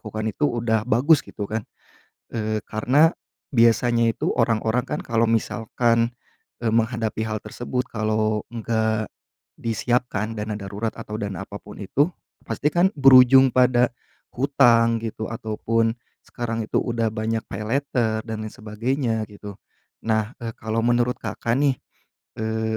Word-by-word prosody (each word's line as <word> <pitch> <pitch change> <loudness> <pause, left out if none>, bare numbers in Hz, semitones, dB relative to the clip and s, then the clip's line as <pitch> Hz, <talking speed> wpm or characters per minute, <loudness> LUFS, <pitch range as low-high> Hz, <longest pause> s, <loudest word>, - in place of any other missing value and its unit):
lakukan 110 0 -5
itu 150 - -2
udah 115 -2 0
bagus 135 +7 +4
gitu 105 - -7
kan. 110 -1 -3 0.7
Eee, 110 -1 -1
karena 135 +9 +3 0.4
biasanya 115 0 +4
itu, - - -2
orang-orang 115 +1 +1
kan - - -4
kalau 115 -1 0
misalkan, 115 +1 +1 0.5
eee, 115 -2 0
menghadapi 115 -1 0
hal 110 -1 -2
tersebut 125 +3 -4
kalau 110 -1 0
nggak 110 -1 0 0.6
disiapkan 115 -1 -1
dana 105 +1 -3
darurat 100 +3 -4
atau 105 - -7
dana 100 -3 -4
apapun 105 0 -10
itu, 145 - +1 0.3
pasti 150 - -1
kan 175 +5 +2
berujung 135 -1 +7
pada 125 -1 +4 0.4
hutang 120 -4 +3
gitu, 110 -1 -5
ataupun 115 +1 -1 0.3
sekarang 115 -2 -4
itu - - -2
udah 115 -2 0
banyak 110 +1 -2
paylater, 110 +1 -1
dan 110 -1 -4
lain 110 - -7
sebagainya 110 +1 -2
gitu. 100 -1 -10 0.5
Nah, 110 +1 0
e 115 -2 -5
kalau 115 +1 -2
menurut 120 +1 +2
Kakak 115 +1 -2
nih, 140 -2 +2 0.6
eee, 110 0 -1
115 Hz, 130 wpm, -23 LUFS, 110-120 Hz, 0.7 s, berujung